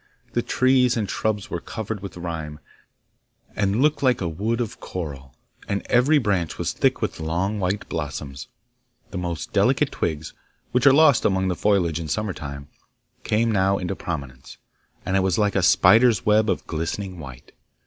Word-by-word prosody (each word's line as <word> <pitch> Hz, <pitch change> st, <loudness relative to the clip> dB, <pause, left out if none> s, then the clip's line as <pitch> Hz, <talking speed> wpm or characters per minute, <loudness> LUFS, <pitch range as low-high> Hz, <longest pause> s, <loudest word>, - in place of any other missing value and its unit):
The -, -, +1 dB
trees 130 Hz, -2 st, +2 dB
and 105 Hz, -3 st, -1 dB
shrubs 105 Hz, +1 st, -2 dB
were 85 Hz, -, -3 dB
covered 110 Hz, -1 st, -5 dB
with 95 Hz, -2 st, -8 dB
rime, 80 Hz, -3 st, -5 dB, 1.0 s
and 105 Hz, +4 st, +1 dB
looked 150 Hz, -1 st, +2 dB
like 130 Hz, -3 st, +3 dB
a 90 Hz, -, -2 dB
wood 105 Hz, +9 st, -2 dB
of 115 Hz, -4 st, -4 dB
coral, 70 Hz, -7 st, -7 dB, 0.3 s
and 100 Hz, 0 st, -2 dB
every 130 Hz, +6 st, +5 dB
branch 100 Hz, -, 0 dB
was -, -, -2 dB
thick -, -, +1 dB
with -, -, -3 dB
long 90 Hz, +6 st, -1 dB
white 95 Hz, +2 st, -2 dB
blossoms. 70 Hz, -3 st, -5 dB, 0.6 s
The 95 Hz, -, -4 dB
most 85 Hz, -2 st, -4 dB
delicate -, -, +2 dB
twigs, 80 Hz, -1 st, -3 dB, 0.4 s
which 125 Hz, +2 st, +3 dB
are -, -, +9 dB
lost 145 Hz, -2 st, +5 dB
among 95 Hz, -1 st, +1 dB
the 90 Hz, -, -1 dB
foliage 90 Hz, -6 st, +1 dB
in 80 Hz, -, -5 dB
summer 105 Hz, +4 st, -2 dB
time, 70 Hz, -3 st, -8 dB, 0.6 s
came 115 Hz, +2 st, +1 dB
now 100 Hz, -1 st, +2 dB
into 90 Hz, +1 st, -3 dB
prominence, 70 Hz, -8 st, -7 dB, 0.5 s
and 95 Hz, -, -1 dB
it -, -, +4 dB
was 95 Hz, -2 st, +1 dB
like 105 Hz, -1 st, +1 dB
a 95 Hz, -, +3 dB
spider's 110 Hz, +6 st, +5 dB
web 105 Hz, 0 st, +3 dB
of 95 Hz, -, -1 dB
glistening 90 Hz, +3 st, -4 dB
white. 65 Hz, -5 st, -11 dB
95 Hz, 170 wpm, -23 LUFS, 80-110 Hz, 1.0 s, are